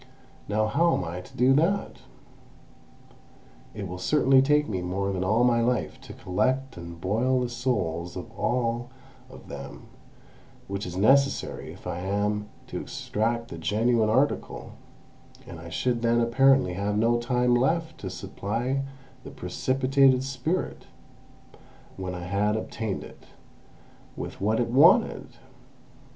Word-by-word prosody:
Now 110 +1 +1
how 165 +9 +2
am - - -2
I 85 +1 -5
to 90 - -15
do 125 +2 +5
that? 170 +8 +1 1.8
It 100 -2 -5
will 90 +1 -7
certainly 135 +5 +4
take 150 +2 +3
me 95 -4 -2
more 95 +2 -2
than 95 -1 -2
all 110 +6 +2
my 120 -1 +3
life 120 -1 -1
to - - -10
collect 130 +8 -1
and 85 -1 -9
boil 115 +8 +1
the 125 -1 -1
souls 95 -9 -2
of 95 +5 -7
all 120 +1 -1 0.4
of - - -13
them, - - -8 0.8
which 100 0 -4
is 90 0 -6
necessary 135 +7 +2
if - - -14
I 85 - -3
am 105 +2 -1 0.2
to - - -5
extract 115 +2 -2
the 85 - -7
genuine 110 +6 +2
article, 130 +6 0 0.7
and 80 - -9
I 85 +1 -9
should 120 +6 -1
then 115 0 +3
apparently 130 -2 +4
have 100 +2 -1
no 115 +2 +3
time 125 0 +1
left 160 +6 +1
to 95 - -5
supply 115 +8 -3 0.4
the - - -8
precipitated 130 +6 +2
spirit, 135 +7 -3 1.1
when 95 -1 -5
I 90 - -6
had 100 +3 0
obtained 110 -2 -4
it, - - -14 0.9
with - - -7
what 110 +3 +1
it 120 - 0
wanted! 170 - +4
115 Hz, 140 wpm, -26 LUFS, 100-130 Hz, 1.8 s, do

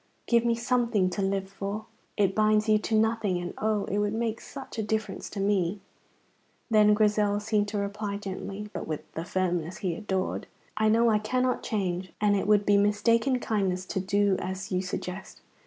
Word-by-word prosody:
Give 235 -1 +3
me 235 -1 +2
something 235 -5 +1
to 180 - -2
live 195 0 0
for. 200 +2 -5 0.3
It 195 -2 +3
binds 215 0 +3
you 215 -1 +4
to 220 - -1
nothing, 220 -4 +1
and 175 0 -4
oh, 215 -2 +1
it 205 - -1
would 205 +1 0
make 225 -1 -2
such 270 -4 -8
a - - +2
difference 215 -1 -3
to 205 - -6
me." 195 -1 +1 0.9
Then 210 -1 +6
Grizel 210 -1 +2
seemed 210 -1 0
to 205 0 -3
reply 200 0 -3
gently, 200 +1 -6
but - - -5
with 155 -2 -5
the 165 - -4
firmness 180 -2 -1
he 180 - +1
adored: 190 +1 -2 0.3
"I 215 0 +2
know 230 +1 +4
I 210 - +3
cannot 250 +4 0
change, 185 -4 -2
and 205 -1 +3
it 195 - -1
would 205 -1 +4
be 205 0 +5
mistaken 225 +5 +3
kindness 190 -5 -1
to 190 - -2
do 200 +1 +2
as 190 +1 -5
you 185 0 +1
suggest. 185 0 -6
205 Hz, 190 wpm, -28 LUFS, 190-215 Hz, 0.9 s, Then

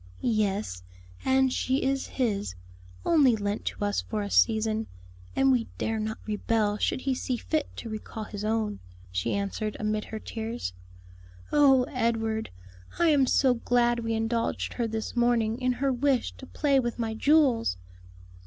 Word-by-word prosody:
"Yes; 205 - 0 0.4
and 265 -1 +3
she 260 +2 0
is 270 0 0
His; 200 - -1 0.5
only 285 -8 +5
lent 205 0 -3
to 205 - -2
us 205 - 0
for 215 -2 -3
a 200 - -5
season; 220 -1 +2 0.5
and 270 0 +4
we 245 -3 +2
dare 225 0 -1
not 220 +1 -3
rebel 210 0 0
should - - 0
He 270 0 0
see 255 -1 -2
fit 310 +5 -1
to - - -6
recall 215 0 -6
His 205 -1 -7
own," 215 -1 -1 0.3
she 90 +5 -1
answered, 200 +2 -2
amid 215 0 -1
her 220 - -6
tears. 225 - -5 0.8
"Oh, 270 -3 +6
Edward, 225 -3 -1 0.5
I 340 -1 +4
am 280 -4 +4
so 260 -1 +4
glad 240 0 +2
we 225 -1 -1
indulged 225 +1 -1
her 235 -2 -1
this 220 +1 -4
morning 240 -1 +2
in 255 0 +2
her 265 +2 0
wish 260 0 +1
to 265 - -10
play 280 -3 +2
with 240 -2 -2
my 225 -2 -2
jewels!" 255 - +3
230 Hz, 160 wpm, -28 LUFS, 215-260 Hz, 0.8 s, Oh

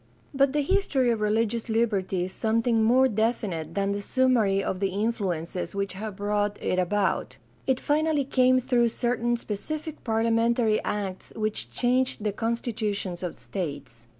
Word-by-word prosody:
But 275 0 +3
the 295 -1 +1
history 280 -8 +2
of 225 -2 -1
religious 220 +2 0
liberty 200 -5 +1
is 185 - -4
something 225 +1 +1
more 255 +4 +5
definite 205 -8 -1
than 200 0 +1
the 200 0 -2
summary 220 -5 +2
of 185 - -2
the 195 - +1
influences 190 -5 -2
which 200 -1 -2
have 210 +1 -6
brought 205 0 -1
it 185 - 0
about; 195 +2 0 0.3
it 260 -1 +2
finally 300 -1 +1
came 255 -1 +4
through 240 -1 +2
certain 240 0 0
specific 305 +9 -5
parlia 225 0 +1
mentary 230 -1 +2
acts 195 -3 -4
which 215 -1 -2
changed 250 -2 +1
the 210 - +1
constitutions 210 -4 -2
of 180 -2 -4
states. 140 - -6
220 Hz, 150 wpm, -26 LUFS, 195-245 Hz, 0.3 s, more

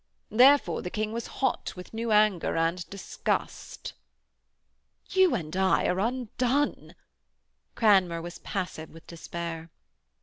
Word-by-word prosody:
Therefore 250 - +5
the 180 - -5
King 215 +2 -2
was 235 0 -4 0.2
hot 265 - 0
with 180 +3 -11
new 225 0 -2
anger 210 -6 +3
and 165 +2 -1
disgust.' 200 -1 -4 1.2
'You 375 -2 +4
and 155 -1 -5
I 190 0 +2
are 180 - +1
undone.' 250 +4 -1 0.8
Cranmer 190 -6 +4
was 175 +1 -8
passive 180 -5 -5
with 165 - -15
despair. 170 -1 -6
190 Hz, 115 wpm, -27 LUFS, 170-230 Hz, 1.2 s, Therefore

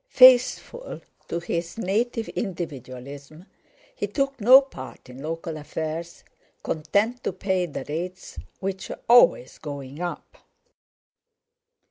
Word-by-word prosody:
Faithful 255 - +5 0.3
to 170 - -2
his 170 +2 -3
native 230 +3 -1
individualism, 145 - -6 0.5
he - - -2
took 275 -3 -2
no 255 +5 +10
part 130 - -10
in 130 +2 -10
local 165 +1 -4
affairs, 160 +3 -5 0.4
content 205 +11 0
to - - 0
pay 185 -1 -1
the 140 -4 -6
rates 180 +5 -5 0.2
which 190 0 -4
were - - -6
always 235 - +5
going 140 0 -7
up. 175 -1 -5
170 Hz, 110 wpm, -25 LUFS, 150-225 Hz, 0.5 s, no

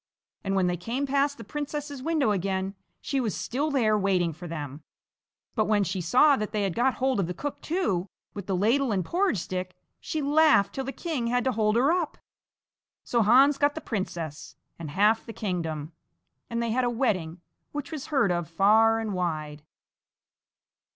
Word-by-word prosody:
And 195 0 -1
when 190 -1 +3
they 180 0 0
came 235 - -2
past 280 +1 +1
the 230 - -9
princess's 290 +2 -5
window 305 -6 +1
again, 190 0 -1 0.3
she 275 - -1
was 220 -5 -2
still 285 +5 -2
there 235 -7 +2
waiting 185 -5 +1
for 175 +4 -9
them, 150 -3 -6 0.7
but 215 -3 +1
when 210 -1 +2
she 185 0 -2
saw 255 - +5
that 215 -2 -3
they 210 -1 0
had 195 -3 -1
got 250 +3 +1
hold 260 -2 0
of 185 - 0
the 180 - -4
cook 290 -1 -5
too, 210 - -1 0.3
with 200 -2 -7
the 195 - 0
ladle 240 +6 +2
and 190 -4 0
porridge 370 - +1
stick, 185 +1 -4 0.2
she 315 - -3
laughed 295 -6 +4
till 270 - -3
the 270 - -3
king 290 -7 -3
had 245 0 +1
to 260 - +1
hold 215 -2 +1
her 265 +6 +4
up. 345 -3 -1 0.9
So 235 - +1
Hans 265 +6 +5
got 290 0 +2
the - - -3
princess 170 - -5 0.2
and 160 -3 -6
half 210 +7 +3
the 225 - -6
kingdom, 165 -7 -3 0.6
and 235 0 -1
they 230 - -1
had 255 +3 +1
a 245 - +2
wedding 190 -9 -1 0.3
which 290 -1 -5
was 305 -4 -5
heard 270 -11 +2
of 175 -2 -2
far 220 +6 +4
and 220 -2 -3
wide. 155 -5 -3
220 Hz, 190 wpm, -27 LUFS, 185-275 Hz, 0.9 s, saw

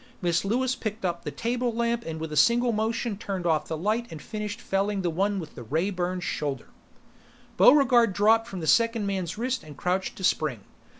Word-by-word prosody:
Miss 170 -2 +1
Lewis 250 +6 +1
picked 215 -4 -4
up 170 -1 -2
the - - -2
table 240 +1 -1
lamp 235 0 -1
and 160 -1 -4
with 160 -1 -5
a - - -4
single 235 - +4
motion 225 0 -1
turned 195 -5 -4
off 155 -3 +1
the 160 - -3
light 215 +7 -1
and 160 - -8
finished 210 +5 -5
felling 195 0 -1
the 175 - 0
one 195 +4 0
with 160 -4 -8
the - - -9
ray 160 - -1
burned 180 -1 -2
shoulder. 140 -7 -3 0.9
Buregarde 250 -5 +6
dropped 220 +4 +3
from 185 -3 -6
the - - -4
second 230 +3 +3
man's 190 -1 -3
wrist 255 +2 -2
and 150 -3 -12
crouched 185 +4 -1
to 190 - -9
spring. 150 - +1
200 Hz, 200 wpm, -26 LUFS, 170-230 Hz, 0.9 s, Buregarde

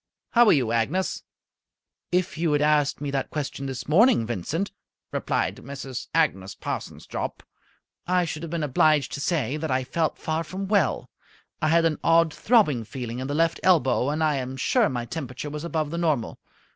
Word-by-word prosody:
"How 240 -1 +6
are - - +7
you, 125 -6 +2
Agnes?" 135 +12 0 0.9
"If 180 0 0
you 165 0 0
had 145 - +2
asked 150 -2 +2
me 145 -1 -2
that 135 -1 -2
question 140 -2 -4
this 130 -2 -5
morning, 170 - +5
Vincent," 120 - -3 0.4
replied - - -1
Mrs. 135 -1 -7
Agnes 100 -13 +1
Parsons - - -5
Jopp, - - -5 0.6
"I 180 0 +2
should 155 -1 -5
have 165 - -6
been 165 -1 -2
obliged 150 0 +3
to 140 - -4
say 150 -3 0
that 160 +1 -3
I 130 0 +1
felt 160 +5 -1
far 160 +1 -2
from 190 +5 -5
well. 195 -7 +1 0.5
I 155 - +2
had 165 +1 +4
an 155 -3 +1
odd 165 -1 +4
throbbing 200 - +3
feeling 120 0 -6
in 130 - -3
the 145 - -2
left 165 +1 +2
elbow, 135 -7 +3
and 155 +2 0
I 150 -2 +2
am 130 0 -4
sure 230 - +2
my 120 -2 -3
temperature 140 +1 -6
was 150 +1 -5
above 160 -3 -2
the 170 - -2
normal. 155 -9 0
150 Hz, 185 wpm, -25 LUFS, 130-165 Hz, 0.9 s, are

